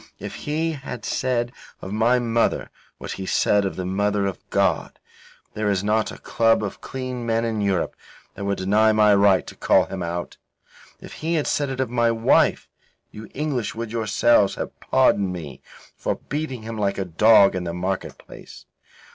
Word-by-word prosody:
If - - -7
he 160 +2 -2
had 135 -4 -7
said 120 -2 -1 0.3
of 95 - -8
my 115 +3 +3
mother 115 -1 0 0.3
what - - -7
he 95 -1 -6
said 100 +1 +2
of 95 - -3
the 90 - -4
Mother 100 +2 0
of 100 -2 -3
God, - - 0 0.6
there 105 -1 -1
is 100 -1 0
not 110 +1 +1
a - - -9
club 115 -1 +2
of 100 - -5
clean 130 -2 -5
men 115 0 0
in 110 -2 -2
Europe 100 -3 0 0.4
that 100 - -7
would 100 0 -1
deny 105 +4 +3
my 105 -1 +5
right 100 -3 +4
to - - -9
call - - +3
him 95 -1 -6
out. 85 0 -4 0.6
If - - -11
he 165 +2 0
had 155 - 0
said 145 -2 0
it 135 -1 -5
of 130 -3 -1
my 120 -1 +2
wife, 115 0 +2 0.4
you 110 +1 -10
English 135 -8 -2
would 115 -1 -5
yourselves 115 -1 +2
have - - -6
pardoned 100 -2 +2
me 80 -7 -8 0.3
for - - -2
beating 145 -6 -5
him 110 0 -6
like 100 -1 0
a 95 - -2
dog 100 +3 +5
in 90 - -2
the 85 - -2
market 90 +2 -3
place. - - -14
110 Hz, 185 wpm, -23 LUFS, 100-120 Hz, 0.6 s, my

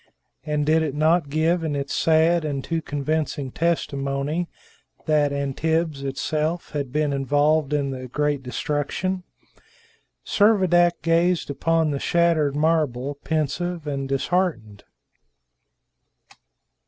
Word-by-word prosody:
And 150 -1 -1
did 160 +2 +3
it 150 -3 -2
not 155 0 +2
give 165 +3 +1
in 155 -2 -1
its 140 0 -3
sad 165 +1 +3
and 140 -3 -3
too 165 -1 -2
convincing 145 -1 -2
testimony 150 0 -1 0.6
that 150 -2 +2
Antibes 145 +2 -1
itself 155 +5 -2
had 140 -4 -3
been 150 0 0
involved 145 +2 +2
in 140 -2 0
the 130 -1 -6
great 145 +2 -1
destruction? 150 +7 -2 1.0
Servadac 185 -5 +3
gazed 170 -1 +2
upon 160 +2 +1
the 140 - -2
shattered 165 -4 +2
marble, 145 -3 0
pensive 160 +2 -2
and 140 -2 -3
disheartened. 135 - -1
150 Hz, 110 wpm, -23 LUFS, 140-165 Hz, 1.0 s, did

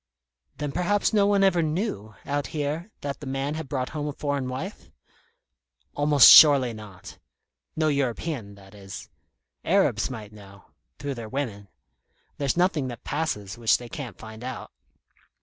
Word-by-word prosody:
"Then 145 -1 -3
perhaps 180 +7 0
no 205 -2 +4
one 200 -1 +3
ever 185 -3 +3
knew, 155 - -3
out 145 0 -2
here, 155 +5 -3
that 140 -1 -4
the 145 - -8
man 135 +2 -2
had 155 -3 -6
brought 130 -2 -2
home 150 -1 -4
a 145 - -3
foreign 140 -3 -2
wife?" 160 +11 -7 1.0
"Almost 145 -2 +6
surely 140 -6 +8
not. 105 -4 -12 0.6
No 155 0 +1
European, 135 -5 -2
that 95 0 -17
is. 100 -1 -10 0.5
Arabs 150 - +2
might 110 -5 -8
know 100 -2 -15 0.3
through 140 -1 -4
their 115 -4 -8
women. 110 -7 -4 0.7
There's 140 +2 0
nothing 175 -6 +1
that 120 -2 -8
passes 110 -10 -3
which 115 -2 +4
they 120 -1 -10
can't 130 -3 -7
find 110 +1 -11
out. 130 +1 -6
140 Hz, 150 wpm, -25 LUFS, 110-155 Hz, 1.0 s, surely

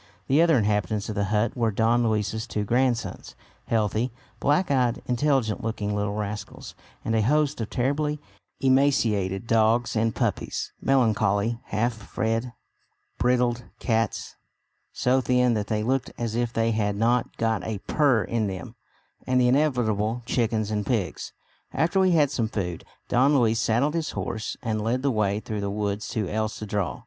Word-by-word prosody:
The 140 +4 +3
other 165 -4 +5
inhabitants 105 -1 0
of - - -2
the 100 -1 0
hut 105 +3 0
were 115 -3 +1
Don 115 +3 +2
Luis's 110 0 -1
two 105 - -2
grandsons, 120 +2 -1 0.3
healthy, 110 +2 0 0.3
black 150 +3 +2
eyed, 125 -3 +1
intelligent 125 -3 +1
looking 105 -2 -2
little 105 0 -1
rascals, 105 0 -5 0.3
and 115 - 0
a 110 - +3
host 150 +3 +1
of 110 - -3
terribly 145 +4 0 0.4
emaciated 115 -8 +2
dogs 115 +1 +2
and 115 0 +1
puppies, - - -2
melancholy 115 -3 +2
half 115 +4 0
fed 115 +2 -2 0.7
brindled 125 -1 +1
cats, 115 -3 -1 0.5
so 130 +1 +2
thin 125 -1 +2
that 105 -2 -2
they 105 -1 -1
looked 130 +2 0
as 115 -2 -3
if 120 0 0
they 115 -1 +1
had 105 -2 0
not 115 +3 +1
got 110 -4 0
a 110 -2 -3
purr 140 -7 +3
in 115 -3 -1
them, 95 -3 -6 0.5
and 130 0 +3
the 125 - +4
inevitable 120 -5 +1
chickens 110 -3 0
and 105 -1 -1
pigs. 110 -8 -2 0.4
After 170 +4 +1
we 190 -1 +4
had 165 -3 +4
had 145 -2 +2
some 115 -6 0
food, 90 -6 -4 0.2
Don 135 +4 +4
Luis 115 -2 +2
saddled 125 +7 +1
his 165 -2 -1
horse 110 -1 -4
and 110 -2 -1
led 120 +4 -1
the 140 - +2
way 105 -3 +1
through 110 -1 -4
the 100 - -2
woods 105 0 -2
to 105 -4 -2
El 110 +3 -1
Cedral. 105 -3 -3
115 Hz, 165 wpm, -25 LUFS, 105-125 Hz, 0.7 s, other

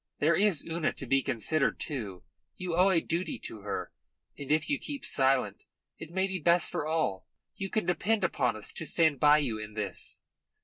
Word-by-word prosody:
There 155 +3 +3
is 195 -5 +2
Una 165 -1 -1
to 135 - -7
be 135 +2 +3
considered, 135 +5 0
too. 105 - -5 0.3
You 180 -2 -3
owe 185 +3 +5
a 170 -4 +3
duty 170 +3 -2
to 110 - -7
her, 100 0 -4 0.4
and 145 0 -6
if 155 0 +2
you 290 - 0
keep 285 -2 -6
silent 135 0 +2 0.3
it 160 - -8
may 190 +3 0
be 190 -1 -3
best 170 +2 +3
for 150 - -2
all. 155 -12 -1 0.3
You 195 - -4
can 215 -2 -1
depend 205 +4 +1
upon 135 -10 +1
us 110 - -5
to 160 - -4
stand 160 -5 +2
by 150 0 +6
you 125 -8 -1
in 110 0 -8
this." 100 -4 -2
155 Hz, 195 wpm, -29 LUFS, 130-180 Hz, 0.4 s, by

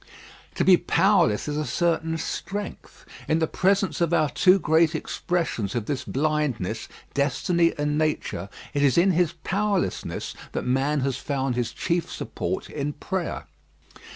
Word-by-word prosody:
To - - +1
be 185 -2 +7
powerless 175 - +3
is 150 0 -2
a 155 - 0
certain 165 0 0
strength. 200 +5 -6 0.2
In 160 - +2
the 165 - +2
presence 195 +3 +1
of 170 0 +3
our 155 -4 +2
two 185 +6 +5
great 160 -1 +3
expressions 155 - -2
of 115 -3 -1
this 140 +1 -2
blindness 140 -8 -1 0.3
destiny 165 +5 +1
and 150 0 0
nature 150 - -1 0.2
it 145 - 0
is 140 0 +3
in 185 +3 +5
his 175 -1 +2
powerlessness 200 0 -1 0.2
that - - -2
man 135 +3 +1
has 130 -1 -1
found 135 -2 -2
his 120 -2 -1
chief 170 -2 -1
support - - -4
in 145 0 -3
prayer. 185 +3 -4
155 Hz, 150 wpm, -25 LUFS, 140-175 Hz, 0.3 s, be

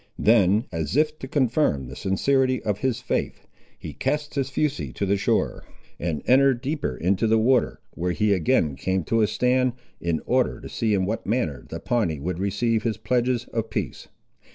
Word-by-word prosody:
Then, 105 0 +4
as 80 - -3
if 155 0 +1
to 130 - -6
confirm 130 - +1
the 65 - -9
sincerity 130 +6 +1
of 105 -1 -1
his 130 -2 -1
faith, - - -3 0.3
he - - -8
cast 150 0 -2
his 135 -2 -1
fusee 145 +1 -1
to 100 - -2
the 100 +1 +2
shore, 100 - 0 0.4
and 80 -1 -2
entered 135 -1 +4
deeper 140 - -2
into 95 +5 +1
the 110 +1 +4
water, 125 +3 +2
where 90 +1 -3
he 105 +3 +2
again 80 -5 +1
came 95 +4 -1
to 115 +8 +1
a 105 - +4
stand, 125 +3 +1 0.3
in 85 -2 -1
order 125 0 +1
to - - -9
see 110 -3 0
in 95 -1 +1
what 110 +4 -3
manner 100 - -1
the - - -5
Pawnee 90 -11 0
would 85 +4 -3
receive 110 +3 0
his 115 -1 -1
pledges 125 -1 0
of 115 -1 -2
peace. - - -4
115 Hz, 185 wpm, -24 LUFS, 95-130 Hz, 0.4 s, Then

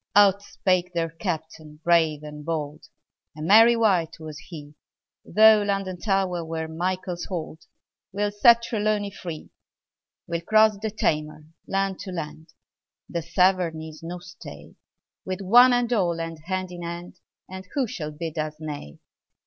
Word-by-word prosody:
Out 200 -1 +6
spake 180 -2 -1
their 165 -1 -1
Captain 160 -3 -6
brave 160 -3 +3
and 150 0 -9
bold: 150 -2 -4 0.5
A - - -7
merry 225 +7 +7
wight 185 -9 +1
was 155 -2 -8
he: 150 -3 -11 0.5
Though 215 0 +6
London 195 -3 -2
Tower 190 -3 0
were 160 0 -4
Michael's 180 +2 -3
hold, 160 -3 -6 0.4
We'll 205 +2 -1
set 235 +3 +5
Trelawny 210 -3 -1
free! 170 -5 -8 0.7
We'll 170 -1 -3
cross 215 +3 +4
the 220 - -1
Tamar, 155 -7 -2 0.2
land 195 -1 -1
to 200 -2 -7
land: 160 -2 -6 0.6
The 170 - -3
Severn 175 0 +2
is 155 -1 -10
no 170 +2 -6
stay: 180 +1 -12 0.5
With 185 +1 -4
"one 245 +6 +7
and 245 0 +1
all," 175 -6 +1
and 165 -1 -5
hand 185 0 -3
in 175 -1 -8
hand; 175 +1 -7 0.3
And 190 0 -9
who 275 -3 +2
shall 160 -8 -5
bid 160 +1 -6
us 155 0 -3
nay? 145 - -7
175 Hz, 150 wpm, -25 LUFS, 160-200 Hz, 0.7 s, merry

